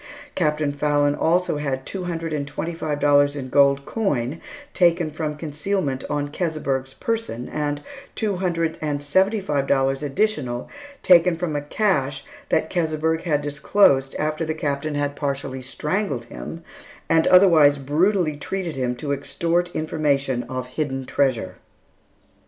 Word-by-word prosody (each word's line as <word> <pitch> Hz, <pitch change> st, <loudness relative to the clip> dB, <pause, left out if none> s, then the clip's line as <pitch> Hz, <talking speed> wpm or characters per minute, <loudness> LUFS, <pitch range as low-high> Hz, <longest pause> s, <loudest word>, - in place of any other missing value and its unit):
Captain 150 Hz, -3 st, 0 dB
Fallon 145 Hz, 0 st, +2 dB
also 170 Hz, +1 st, +1 dB
had 135 Hz, -3 st, -3 dB
two 190 Hz, -2 st, -4 dB
hundred 165 Hz, -2 st, -3 dB
and 140 Hz, -2 st, -2 dB
twenty 165 Hz, +4 st, -4 dB
five 155 Hz, -3 st, -3 dB
dollars 145 Hz, 0 st, +4 dB
in 130 Hz, -3 st, -5 dB
gold 140 Hz, 0 st, +4 dB
coin 150 Hz, -, -1 dB, 0.3 s
taken 170 Hz, -3 st, +3 dB
from 155 Hz, -1 st, -3 dB
concealment 150 Hz, -2 st, -2 dB
on 145 Hz, -1 st, -1 dB
Keseberg's 140 Hz, -6 st, -2 dB
person, 225 Hz, -, -3 dB
and 145 Hz, -1 st, -3 dB, 0.3 s
two 210 Hz, -4 st, -1 dB
hundred 165 Hz, -3 st, -1 dB
and 145 Hz, -2 st, -2 dB
seventy 190 Hz, +9 st, +2 dB
five 145 Hz, -7 st, -1 dB
dollars 135 Hz, 0 st, +1 dB
additional 140 Hz, -, -1 dB, 0.4 s
taken 175 Hz, -1 st, +6 dB
from 170 Hz, -3 st, -2 dB
a 145 Hz, -, 0 dB
cache 145 Hz, -5 st, 0 dB, 0.2 s
that 160 Hz, -, +1 dB
Keseberg 160 Hz, -1 st, 0 dB
had 150 Hz, -4 st, +1 dB
disclosed 145 Hz, -2 st, +3 dB
after 155 Hz, +1 st, -1 dB
the 155 Hz, -1 st, -2 dB
Captain 145 Hz, 0 st, -2 dB
had 145 Hz, 0 st, -1 dB
partially 140 Hz, -2 st, -3 dB
strangled 145 Hz, -, -2 dB
him, 165 Hz, +7 st, -8 dB, 0.4 s
and 165 Hz, 0 st, +3 dB
otherwise 165 Hz, -6 st, +6 dB
brutally 155 Hz, +4 st, +1 dB
treated 175 Hz, +2 st, -4 dB
him, 125 Hz, -2 st, -1 dB
to 140 Hz, +4 st, -4 dB
extort 165 Hz, +5 st, 0 dB
information 145 Hz, -5 st, 0 dB
of 130 Hz, -1 st, -3 dB
hidden 135 Hz, 0 st, -3 dB
treasure. 130 Hz, -8 st, 0 dB
150 Hz, 140 wpm, -23 LUFS, 140-165 Hz, 0.4 s, taken